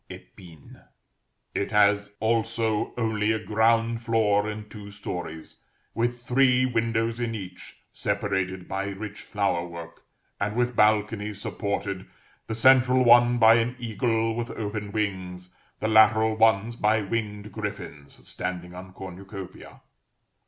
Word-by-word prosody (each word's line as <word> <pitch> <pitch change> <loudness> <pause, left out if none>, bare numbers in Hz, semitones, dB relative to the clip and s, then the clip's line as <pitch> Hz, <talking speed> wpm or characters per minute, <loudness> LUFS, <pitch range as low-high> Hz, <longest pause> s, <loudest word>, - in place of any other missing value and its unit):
épine_; 85 -5 -14 0.7
it 100 - -2
has 100 -1 +3
also 110 -1 0
only 110 -2 0
a 110 - +1
ground 115 +1 +1
floor 110 -3 +2
and 105 0 -7
two 105 -2 -9
stories, 90 -5 -7 0.4
with 120 +1 -2
three 125 0 +3
windows 115 -1 0
in 115 -2 -2
each, 95 -3 -9 0.2
separated 95 -2 -2
by 95 +1 -3
rich 100 +1 -7
flower 100 -5 -1
work, 85 -1 -10 0.4
and 100 +1 -2
with 125 0 0
balconies, 105 -1 +1
supported, 100 -2 -3 0.4
the 110 - -3
central 130 +1 +5
one 120 0 +6
by 115 -1 +7
an 115 +2 +1
eagle 115 -1 -1
with 120 +1 -3
open 105 -1 -4
wings, 95 -4 -4 0.3
the 110 - -1
lateral 110 0 +5
ones 110 +1 +3
by 110 -1 +2
winged 105 -1 -4
griffins 100 -9 -7
standing 90 -1 -5
on 95 +1 -10
cornucopiæ. 95 0 -10
105 Hz, 125 wpm, -26 LUFS, 100-115 Hz, 0.7 s, by